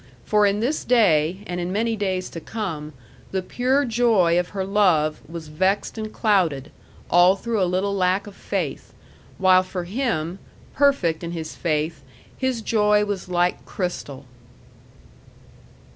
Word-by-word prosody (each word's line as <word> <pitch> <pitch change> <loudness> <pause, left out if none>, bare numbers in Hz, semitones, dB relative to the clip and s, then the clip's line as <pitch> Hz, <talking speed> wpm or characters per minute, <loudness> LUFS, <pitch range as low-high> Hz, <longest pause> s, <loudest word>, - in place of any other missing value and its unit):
For 210 -1 +3
in 200 +1 0
this 275 +7 -1
day, 185 -6 +3
and 180 -2 -4
in 175 +1 -3
many 225 +3 0
days 190 -3 -2
to 165 - -6
come, 160 -7 -5 0.4
the 190 -1 -2
pure 260 +7 +1
joy 220 -8 +3
of 180 - -2
her 195 -2 -3
love 180 -7 +2
was 165 -2 -7
vexed 190 +7 0
and 215 -1 -5
clouded, 170 - +1 0.4
all 175 +2 +6
through 225 +1 -2
a 180 - +2
little 190 +2 0
lack 185 0 +1
of 205 - -10
faith; - - -4 0.4
while 185 -1 +5
for 185 -1 -5
him, 190 - -2 0.3
perfect 230 - +2
in 170 0 -4
his 160 -2 -6
faith, 155 -2 -1 0.3
his 260 -4 -2
joy 210 -2 +3
was 200 -3 -4
like 175 0 0
crystal. 145 -7 -5
185 Hz, 145 wpm, -23 LUFS, 170-210 Hz, 0.4 s, all